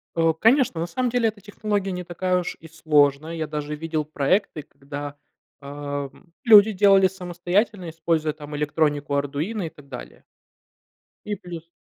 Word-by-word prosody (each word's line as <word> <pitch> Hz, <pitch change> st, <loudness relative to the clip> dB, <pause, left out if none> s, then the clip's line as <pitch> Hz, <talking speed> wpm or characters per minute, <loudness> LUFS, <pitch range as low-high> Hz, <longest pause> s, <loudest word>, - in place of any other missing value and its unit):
Э, 165 Hz, -1 st, +3 dB
конечно, 235 Hz, -, +3 dB
на 170 Hz, -, -1 dB
самом 250 Hz, +7 st, -1 dB
деле 230 Hz, -2 st, +2 dB
эта 205 Hz, -1 st, -11 dB
технология 205 Hz, -1 st, -2 dB
не 180 Hz, -1 st, -4 dB
такая 180 Hz, +1 st, 0 dB
уж 175 Hz, -, -5 dB
и 165 Hz, -, -12 dB
сложная. 155 Hz, -1 st, +2 dB
Я 160 Hz, -1 st, -3 dB
даже 150 Hz, 0 st, -4 dB
видел 155 Hz, 0 st, -3 dB
проекты, 155 Hz, +3 st, 0 dB
когда, 145 Hz, +1 st, -8 dB, 0.5 s
ам, 145 Hz, +3 st, -6 dB
люди 220 Hz, -3 st, +8 dB
делали 195 Hz, -1 st, +5 dB
самостоятельно, 185 Hz, +1 st, -2 dB
используя 160 Hz, -1 st, -1 dB
там 150 Hz, 0 st, -9 dB
электронику 145 Hz, -1 st, 0 dB
"Ардуино" 150 Hz, +9 st, -2 dB
и 165 Hz, -, -3 dB
так 145 Hz, -2 st, -17 dB
далее. 125 Hz, -3 st, -10 dB, 1.0 s
И 210 Hz, -, -2 dB
плюс. 170 Hz, -3 st, -9 dB
165 Hz, 150 wpm, -24 LUFS, 150-195 Hz, 1.0 s, люди